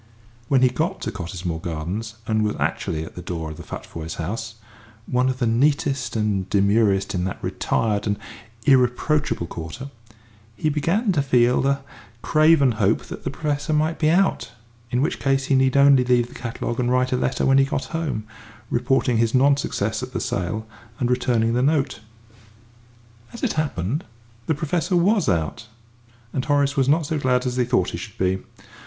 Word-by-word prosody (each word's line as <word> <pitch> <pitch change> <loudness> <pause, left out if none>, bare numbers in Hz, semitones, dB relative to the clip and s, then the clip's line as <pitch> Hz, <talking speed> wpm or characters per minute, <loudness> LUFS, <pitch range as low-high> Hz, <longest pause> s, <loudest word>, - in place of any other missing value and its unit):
When 130 0 +3
he 130 - +6
got 160 +9 -2
to - - -3
Cottesmore 90 -3 -5
Gardens, 90 +8 -4
and 110 -1 +1
was 105 -1 0
actually 80 -1 -2
at - - -11
the 90 - -8
door 80 -3 -5
of 80 - -9
the - - -8
Futvoyes' 80 0 -7
house, 115 +7 -4 0.5
one 125 +1 +1
of 130 - -2
the 125 - 0
neatest 135 0 +1
and 105 -4 0
demurest 100 -1 +2
in 90 -2 -1
that 95 - -3
retired 110 -2 0
and 105 -1 0 0.5
irreproachable 135 - +2
quarter, 85 - -7 0.6
he 155 - 0
began 170 - +1
to 155 -6 +2
feel 125 -1 +3
a 140 0 0 0.4
craven 155 -4 +4
hope 105 -1 +1
that - - -9
the - - -2
Professor 150 0 -2
might 155 +2 +1
be 155 - +3
out, 190 +4 +1 0.4
in 125 +2 +1
which 155 - -1
case 135 -1 +1
he 135 - +2
need 130 0 +3
only 140 -2 +6
leave 125 -1 +2
the - - -14
catalogue 120 0 -4
and 120 -1 +1
write 125 0 +2
a - - +2
letter 125 +1 0
when 135 0 +5
he - - +6
got 135 0 -2
home, 160 -10 -2 0.5
reporting 125 0 +2
his 115 +2 +2
non 140 +2 +5
success 110 -5 -2
at 130 0 -7
the 120 - -1
sale, 105 +1 -2 0.3
and 125 -1 +1
returning 120 -2 +1
the 125 - +1
note. 140 -3 +1 1.3
And, - - -13
as 235 - -9
it 260 - +1
happened, 145 - -2 0.4
the 160 - +1
Professor 165 +5 -1
was 190 - +3
out, 85 +5 -1 0.7
and 130 - -1
Horace 145 -1 +1
was 135 -1 +2
not 155 +2 +3
so 155 +1 -2
glad 125 -2 +1
as 125 0 -2
he 125 - +2
thought 120 - +1
he - - -4
should - - -9
be. 95 0 +1
125 Hz, 185 wpm, -23 LUFS, 110-140 Hz, 1.3 s, he